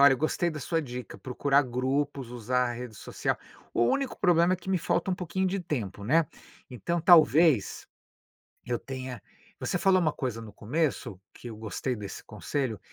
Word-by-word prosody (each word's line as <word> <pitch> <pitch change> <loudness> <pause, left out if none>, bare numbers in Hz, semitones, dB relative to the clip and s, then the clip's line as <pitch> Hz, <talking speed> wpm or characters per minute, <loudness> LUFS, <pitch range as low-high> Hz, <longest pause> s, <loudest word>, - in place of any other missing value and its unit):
olha, 140 -1 +8
gostei 155 +4 0
da 155 - -6
sua 165 +5 0
dica, 125 -2 -7
procurar 140 +2 +2
grupos, 130 +1 -1
usar 125 +1 0
a - - -2
rede 120 -1 -7
social. - - -2 0.4
O 120 - +3
único 275 - 0
problema 175 0 +4
é - - -5
que 190 +2 -6
me 185 - +2
falta 175 +3 0
um - - +2
pouquinho 180 +2 -1
de 190 +1 -1
tempo, 115 - -4
né. 155 +6 +4 0.4
Então 170 +8 -2
talvez, 160 - +5 0.8
eu 120 -1 -1
tenha 130 -4 -6 0.4
você 180 - -1
falou 190 -1 +5
uma 155 -4 +1
coisa 125 -4 -3
no 110 -2 -10
começo, 130 - -2
que - - -10
eu 110 - -8
gostei 115 +3 -3
desse 105 -2 -7
conselho, 130 -8 -3
135 Hz, 175 wpm, -28 LUFS, 120-170 Hz, 0.8 s, olha